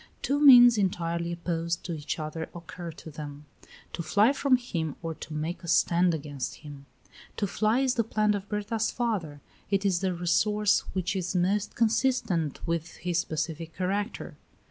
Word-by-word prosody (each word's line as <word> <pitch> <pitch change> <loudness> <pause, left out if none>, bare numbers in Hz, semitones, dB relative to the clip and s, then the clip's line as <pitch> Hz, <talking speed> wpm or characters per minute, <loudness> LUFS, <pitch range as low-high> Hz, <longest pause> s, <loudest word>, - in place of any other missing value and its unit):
Two 285 +1 +1
means 245 -5 +9
entirely 170 -3 -1
opposed 170 -1 -2
to 175 - -4
each 150 -2 -4
other 155 +1 -5
occur 170 0 -8
to 160 - -11
them 145 -1 -8 0.5
to - - -3
fly 205 - +3
from 275 -1 +3
him 165 - -4
or 165 0 -3
to 155 - -10
make 160 +4 -4
a - - -8
stand 170 +1 +3
against 145 -3 -5
him. 140 -1 -10 0.5
To 205 - 0
fly 215 +5 +1
is 265 -2 +2
the 230 - +1
plan 215 -1 +1
of 205 0 -5
Berta's 215 +1 -1
father; 190 -12 -2 0.3
it 200 0 +1
is 185 -3 +2
the 185 -1 -1
resource 210 +4 +2
which 185 +1 -1
is 185 0 -2
most 195 +3 0
consistent 225 - 0
with 165 0 -3
his 175 0 -1
pacific 160 +1 -4
character. 195 +3 -3
175 Hz, 165 wpm, -28 LUFS, 165-210 Hz, 0.5 s, means